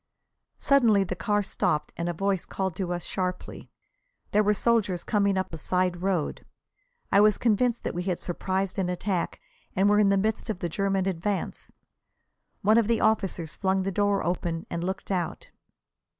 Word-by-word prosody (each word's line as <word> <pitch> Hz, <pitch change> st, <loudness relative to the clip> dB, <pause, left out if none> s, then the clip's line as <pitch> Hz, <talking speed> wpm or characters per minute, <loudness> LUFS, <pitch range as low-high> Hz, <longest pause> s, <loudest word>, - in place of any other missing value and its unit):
Suddenly 230 Hz, -8 st, +4 dB
the 185 Hz, -1 st, -4 dB
car 205 Hz, +4 st, 0 dB
stopped 155 Hz, -5 st, -1 dB
and 170 Hz, +1 st, -2 dB
a -, -, +1 dB
voice 195 Hz, +1 st, -1 dB
called 190 Hz, -3 st, -3 dB
to 185 Hz, -3 st, -2 dB
us 175 Hz, -1 st, -3 dB
sharply. 180 Hz, -1 st, -4 dB, 0.6 s
There 210 Hz, -, +4 dB
were 210 Hz, 0 st, +2 dB
soldiers 205 Hz, -5 st, +1 dB
coming 200 Hz, -3 st, +1 dB
up 185 Hz, -2 st, -2 dB
a 160 Hz, -, -5 dB
side 180 Hz, +1 st, 0 dB
road. 185 Hz, -5 st, -1 dB, 0.7 s
I 200 Hz, -, +6 dB
was 210 Hz, -1 st, +5 dB
convinced 240 Hz, +1 st, +1 dB
that -, -, -2 dB
we 175 Hz, -, -2 dB
had 180 Hz, -1 st, -1 dB
surprised 190 Hz, +2 st, -2 dB
an 180 Hz, -2 st, 0 dB
attack, 180 Hz, 0 st, -2 dB, 0.4 s
and 195 Hz, +2 st, +3 dB
were 210 Hz, 0 st, +4 dB
in 205 Hz, -2 st, +5 dB
the 200 Hz, -, +3 dB
midst 215 Hz, +3 st, -1 dB
of 215 Hz, -, -1 dB
the 175 Hz, -1 st, -3 dB
German 195 Hz, +2 st, 0 dB
advance. 190 Hz, +2 st, -3 dB, 0.9 s
One 215 Hz, +3 st, +5 dB
of 225 Hz, -, +1 dB
the 230 Hz, -1 st, +2 dB
officers 195 Hz, -7 st, 0 dB
flung 190 Hz, -1 st, 0 dB
the 195 Hz, -, -1 dB
door 205 Hz, +1 st, +1 dB
open 170 Hz, -1 st, -2 dB
and 170 Hz, -, -2 dB
looked 190 Hz, +2 st, -4 dB
out. 180 Hz, -3 st, -3 dB
195 Hz, 180 wpm, -27 LUFS, 180-205 Hz, 0.9 s, I